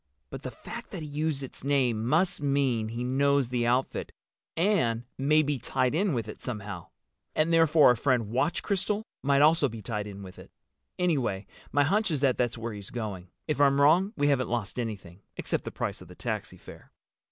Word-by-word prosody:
But -, -, -6 dB
the -, -, -5 dB
fact -, -, -9 dB
that 160 Hz, -, -6 dB
he -, -, -6 dB
used 150 Hz, -1 st, -2 dB
its 130 Hz, -, -9 dB
name 130 Hz, -6 st, +1 dB
must 175 Hz, +5 st, +2 dB
mean 135 Hz, -6 st, +1 dB
he 115 Hz, +2 st, -4 dB
knows 140 Hz, 0 st, +2 dB
the 120 Hz, -1 st, 0 dB
outfit—and 130 Hz, -, -1 dB
may 150 Hz, +3 st, +3 dB
be 145 Hz, -2 st, -1 dB
tied 125 Hz, +2 st, 0 dB
in 180 Hz, -1 st, +1 dB
with 115 Hz, -, -2 dB
it -, -, -9 dB
somehow. 105 Hz, -7 st, -6 dB, 0.5 s
And 160 Hz, +2 st, +2 dB
therefore 165 Hz, -3 st, +6 dB
our 125 Hz, -, +5 dB
friend 120 Hz, -3 st, +1 dB
Watch 130 Hz, -, 0 dB
Crystal 205 Hz, +1 st, -1 dB, 0.2 s
might 140 Hz, +1 st, +3 dB
also 155 Hz, -2 st, +4 dB
be 110 Hz, -2 st, -9 dB
tied 105 Hz, -1 st, -3 dB
in 100 Hz, -1 st, -8 dB
with 95 Hz, -1 st, -11 dB
it. -, -, -13 dB, 0.5 s
Anyway, 135 Hz, -, 0 dB, 0.3 s
my 145 Hz, -, +4 dB
hunch 200 Hz, +8 st, +2 dB
is 150 Hz, -5 st, -1 dB
that 135 Hz, -3 st, +3 dB
that's 120 Hz, -1 st, 0 dB
where 115 Hz, 0 st, -4 dB
he's 100 Hz, -2 st, -8 dB
going. 105 Hz, -6 st, -5 dB, 0.2 s
If 150 Hz, -2 st, 0 dB
I'm 140 Hz, 0 st, +4 dB
wrong 170 Hz, +8 st, +5 dB
we 145 Hz, 0 st, +2 dB
haven't 130 Hz, -3 st, +1 dB
lost 120 Hz, -1 st, -2 dB
anything, 100 Hz, -6 st, -5 dB, 0.2 s
except -, -, -2 dB
the -, -, -4 dB
price -, -, -4 dB
of -, -, -12 dB
the -, -, -13 dB
taxi -, -, -4 dB
fare." -, -, -14 dB
135 Hz, 200 wpm, -28 LUFS, 115-155 Hz, 0.5 s, therefore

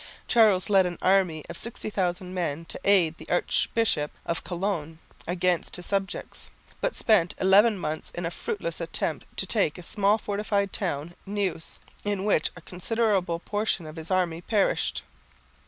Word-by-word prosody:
Charles 210 Hz, -6 st, +5 dB
led 195 Hz, -3 st, +5 dB
an 175 Hz, -1 st, -5 dB
army 185 Hz, -5 st, +3 dB
of -, -, -7 dB
60,000 185 Hz, -5 st, -2 dB
men 165 Hz, -3 st, -2 dB
to -, -, -6 dB
aid 180 Hz, -5 st, +4 dB
the -, -, -11 dB
Archbishop 175 Hz, -3 st, +1 dB, 0.2 s
of 170 Hz, -, -2 dB
Cologne 175 Hz, -4 st, -3 dB, 0.3 s
against 175 Hz, 0 st, +1 dB
his 180 Hz, -, -6 dB
subjects, 195 Hz, -2 st, -3 dB, 0.3 s
but -, -, 0 dB
spent 195 Hz, -7 st, +3 dB
eleven 200 Hz, +3 st, +5 dB
months 155 Hz, -3 st, -3 dB
in 175 Hz, -, -3 dB
a 165 Hz, -, -2 dB
fruitless 470 Hz, -, -4 dB
attempt -, -, -2 dB
to -, -, +2 dB
take 195 Hz, -9 st, +1 dB
a 180 Hz, -, -9 dB
small 205 Hz, +3 st, +3 dB
fortified 205 Hz, -1 st, -1 dB
town, 170 Hz, -3 st, -2 dB
Neuss, 195 Hz, -5 st, -2 dB, 0.2 s
in 205 Hz, -1 st, -1 dB
which 200 Hz, -7 st, +3 dB
a 170 Hz, -, -11 dB
considerable 185 Hz, -1 st, 0 dB
portion 205 Hz, -1 st, -1 dB
of 155 Hz, 0 st, -8 dB
his 160 Hz, 0 st, -6 dB
army 175 Hz, -3 st, +1 dB
perished. 205 Hz, +2 st, +1 dB
185 Hz, 155 wpm, -27 LUFS, 170-205 Hz, 0.3 s, Charles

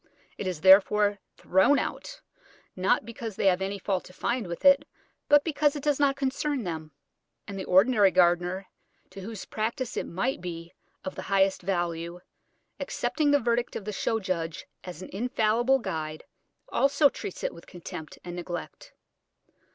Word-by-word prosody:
It 195 Hz, -, -3 dB
is, 175 Hz, -4 st, -3 dB
therefore, 200 Hz, +2 st, +6 dB, 0.2 s
thrown 190 Hz, +10 st, +4 dB
out, -, -, -4 dB, 0.5 s
not 185 Hz, +2 st, +1 dB
because 230 Hz, -2 st, -6 dB
they -, -, -2 dB
have 190 Hz, -1 st, +4 dB
any 195 Hz, +1 st, -2 dB
fault 190 Hz, -1 st, -2 dB
to 180 Hz, -, -14 dB
find 235 Hz, +1 st, -2 dB
with 170 Hz, +9 st, -6 dB
it, 280 Hz, 0 st, +7 dB, 0.5 s
but 290 Hz, 0 st, +6 dB
because 300 Hz, -2 st, +1 dB
it 290 Hz, -, -5 dB
does 295 Hz, -2 st, +1 dB
not 280 Hz, -1 st, +3 dB
concern 275 Hz, 0 st, -1 dB
them; 160 Hz, -4 st, -5 dB, 0.6 s
and 200 Hz, -, -6 dB
the 190 Hz, -, -5 dB
ordinary 200 Hz, +2 st, +5 dB
gardener, 180 Hz, +1 st, +2 dB, 0.5 s
to 195 Hz, -, -9 dB
whose 215 Hz, +1 st, -7 dB
practice 230 Hz, +3 st, -3 dB
it -, -, -2 dB
might 195 Hz, +6 st, -2 dB
be 170 Hz, -1 st, -7 dB, 0.3 s
of 190 Hz, -, -4 dB
the -, -, -6 dB
highest 195 Hz, -1 st, +3 dB
value, 175 Hz, -2 st, -2 dB, 0.6 s
accepting 305 Hz, -2 st, -1 dB
the 285 Hz, 0 st, +5 dB
verdict 240 Hz, -1 st, 0 dB
of 200 Hz, -, -5 dB
the 210 Hz, -, -4 dB
show 225 Hz, +3 st, 0 dB
judge 170 Hz, -5 st, -3 dB, 0.2 s
as 180 Hz, -1 st, -8 dB
an -, -, -9 dB
infallible 235 Hz, +3 st, +2 dB
guide, 155 Hz, -9 st, -5 dB, 0.5 s
also 285 Hz, +2 st, +4 dB
treats 195 Hz, -, -6 dB
it -, -, -1 dB
with 170 Hz, -, -14 dB
contempt 160 Hz, -3 st, -9 dB
and 175 Hz, 0 st, -7 dB
neglect. 175 Hz, 0 st, -7 dB
195 Hz, 165 wpm, -27 LUFS, 180-250 Hz, 0.6 s, it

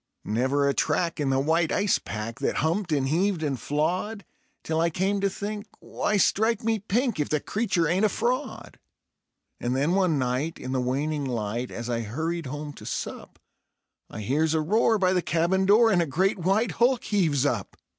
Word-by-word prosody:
Never 130 Hz, +6 st, +1 dB
a 140 Hz, -, +2 dB
track 170 Hz, +2 st, 0 dB
in 145 Hz, -2 st, 0 dB
the 135 Hz, 0 st, +2 dB
white 160 Hz, +3 st, +1 dB
ice 200 Hz, -1 st, +2 dB
pack 115 Hz, +4 st, -6 dB
that 135 Hz, -, -1 dB
humped 175 Hz, +2 st, -1 dB
and 140 Hz, -3 st, +1 dB
heaved 175 Hz, +3 st, +1 dB
and 140 Hz, -4 st, -1 dB
flawed, 180 Hz, +7 st, -2 dB, 0.4 s
Till 160 Hz, 0 st, 0 dB
I 170 Hz, -, +3 dB
came 195 Hz, +4 st, 0 dB
to 200 Hz, -, +2 dB
think: 205 Hz, +2 st, -5 dB
"Why, 210 Hz, -, -1 dB
strike 220 Hz, +3 st, +2 dB
me 225 Hz, -1 st, +1 dB
pink! 225 Hz, -, 0 dB
if 150 Hz, -, 0 dB
the 155 Hz, -, +1 dB
creature 190 Hz, -3 st, 0 dB
ain't 180 Hz, +6 st, +1 dB
a -, -, +3 dB
fraud." 245 Hz, +7 st, -3 dB, 0.8 s
And 125 Hz, +1 st, -1 dB
then 140 Hz, +5 st, +1 dB
one 185 Hz, -5 st, +2 dB
night 130 Hz, +5 st, -1 dB
in 130 Hz, -, -6 dB
the 130 Hz, -1 st, 0 dB
waning 140 Hz, +4 st, -1 dB
light, 120 Hz, 0 st, -3 dB
as 115 Hz, 0 st, -6 dB
I 120 Hz, -1 st, -1 dB
hurried 160 Hz, +8 st, -3 dB
home 145 Hz, +2 st, -6 dB
to -, -, -13 dB
sup, -, -, -5 dB, 0.7 s
I -, -, -7 dB
hears 150 Hz, +9 st, +1 dB
a 160 Hz, -, +2 dB
roar 220 Hz, +7 st, +3 dB
by 185 Hz, -2 st, +2 dB
the 180 Hz, -, +2 dB
cabin 175 Hz, +4 st, +1 dB
door, 225 Hz, +3 st, +6 dB
and 180 Hz, -3 st, +3 dB
a 170 Hz, -, 0 dB
great 190 Hz, +8 st, +1 dB
white 195 Hz, +7 st, +1 dB
hulk 245 Hz, +1 st, +2 dB
heaves 160 Hz, -10 st, +1 dB
up. 115 Hz, -9 st, -2 dB
165 Hz, 195 wpm, -26 LUFS, 140-200 Hz, 0.8 s, door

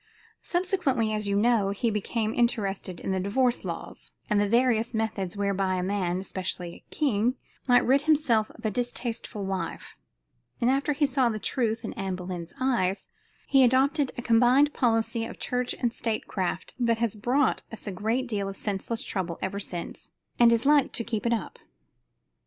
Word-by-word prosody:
Subsequently, 345 Hz, -, 0 dB
as 210 Hz, -1 st, -1 dB
you 200 Hz, -, +1 dB
know, 215 Hz, -1 st, +3 dB
he 215 Hz, +4 st, 0 dB
became 215 Hz, +1 st, -1 dB
interested 200 Hz, -6 st, 0 dB
in -, -, -3 dB
the 190 Hz, -, 0 dB
divorce 235 Hz, +6 st, +1 dB
laws, -, -, -6 dB, 0.2 s
and 205 Hz, -1 st, +4 dB
the 205 Hz, -, +1 dB
various 235 Hz, 0 st, +2 dB
methods 215 Hz, -4 st, -2 dB
whereby 195 Hz, -2 st, 0 dB
a 180 Hz, -, -1 dB
man, 185 Hz, -2 st, 0 dB
especially 185 Hz, -2 st, -4 dB
a -, -, -17 dB
king, 250 Hz, -4 st, +1 dB, 0.3 s
might 245 Hz, -1 st, +5 dB
rid 270 Hz, +2 st, +4 dB
himself 290 Hz, -8 st, +2 dB
of 225 Hz, -, -13 dB
a 215 Hz, -, +1 dB
distasteful 235 Hz, -2 st, -3 dB
wife; 190 Hz, -1 st, -4 dB, 0.6 s
and 240 Hz, +2 st, +3 dB
after 275 Hz, +2 st, +1 dB
he 290 Hz, +1 st, +2 dB
saw 265 Hz, -3 st, +2 dB
the 215 Hz, -, -2 dB
truth 225 Hz, 0 st, -1 dB
in -, -, -4 dB
Anne 195 Hz, -1 st, -3 dB
Boleyn's 180 Hz, -2 st, -6 dB
eyes, 230 Hz, -8 st, +1 dB, 0.4 s
he 270 Hz, -1 st, +5 dB
adopted 270 Hz, +3 st, +3 dB
a 245 Hz, -, -4 dB
combined 250 Hz, +5 st, +4 dB
policy 225 Hz, -2 st, +1 dB
of 230 Hz, -, -6 dB
church 250 Hz, 0 st, -2 dB
and 240 Hz, -2 st, 0 dB
state 225 Hz, -3 st, -2 dB
craft 185 Hz, -1 st, -3 dB
that 230 Hz, -2 st, +2 dB
has 230 Hz, -2 st, 0 dB
brought 250 Hz, +6 st, +1 dB
us 225 Hz, -, -8 dB
a 205 Hz, -, -3 dB, 0.3 s
deal 205 Hz, -5 st, -2 dB
of 195 Hz, -, -7 dB
senseless 210 Hz, +3 st, -3 dB
trouble 180 Hz, -4 st, -3 dB
ever 195 Hz, +1 st, -3 dB
since 175 Hz, -3 st, -6 dB, 0.3 s
and 235 Hz, -1 st, +7 dB
is 230 Hz, +1 st, +2 dB
like 290 Hz, -1 st, +4 dB
to 230 Hz, -, 0 dB
keep 220 Hz, 0 st, -2 dB
it -, -, +1 dB
up. 230 Hz, -, -4 dB
225 Hz, 175 wpm, -27 LUFS, 200-250 Hz, 0.6 s, and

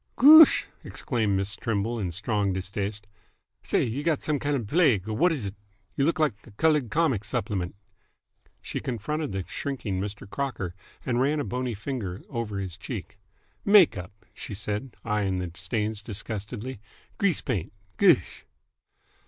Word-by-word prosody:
"Goosh!" 310 Hz, +4 st, +9 dB, 0.2 s
exclaimed 110 Hz, -7 st, -1 dB
Miss 100 Hz, +1 st, -2 dB
Trimble 115 Hz, +2 st, -1 dB
in 95 Hz, -4 st, -2 dB
strong 105 Hz, +1 st, 0 dB
distaste. 100 Hz, +3 st, -3 dB, 0.6 s
"Say, -, -, +1 dB
've 110 Hz, -, -3 dB
you 140 Hz, -, -2 dB
got 155 Hz, -2 st, +1 dB
some 150 Hz, -2 st, 0 dB
kind 145 Hz, +1 st, 0 dB
of 125 Hz, -, -1 dB
a -, -, -8 dB
plague, 125 Hz, -, +3 dB
or 110 Hz, -, -2 dB
wh't 175 Hz, +8 st, +4 dB
is 140 Hz, -10 st, -2 dB
it? 100 Hz, 0 st, -5 dB, 0.4 s
Y'look 145 Hz, +5 st, +2 dB
like 155 Hz, -6 st, +2 dB
a -, -, -11 dB
coloured 150 Hz, +3 st, +2 dB
comic 135 Hz, -6 st, +1 dB
supplement!" 100 Hz, -3 st, -2 dB, 0.9 s
She -, -, -3 dB
confronted 135 Hz, +5 st, -3 dB
the 95 Hz, -1 st, -3 dB
shrinking 110 Hz, -9 st, -3 dB
Mr. 105 Hz, 0 st, -6 dB
Crocker 105 Hz, -7 st, -3 dB, 0.3 s
and 120 Hz, -1 st, +1 dB
ran 145 Hz, +3 st, +2 dB
a -, -, 0 dB
bony 125 Hz, -2 st, -2 dB
finger 105 Hz, -5 st, -4 dB
over 115 Hz, -6 st, -3 dB
his 95 Hz, -3 st, -4 dB
cheek. 105 Hz, -2 st, -7 dB, 0.4 s
"Make 200 Hz, -4 st, +7 dB
up!" 95 Hz, +3 st, -9 dB
she 105 Hz, -, -7 dB
said, 105 Hz, +5 st, -3 dB
eyeing 105 Hz, -4 st, 0 dB
the 90 Hz, -2 st, -3 dB
stains 105 Hz, +5 st, -2 dB
disgustedly. 105 Hz, +3 st, -5 dB, 0.4 s
"Grease 200 Hz, -5 st, +2 dB
paint! 105 Hz, -, -2 dB, 0.3 s
Goosh!" -, -, +4 dB
110 Hz, 160 wpm, -27 LUFS, 100-135 Hz, 0.9 s, Goosh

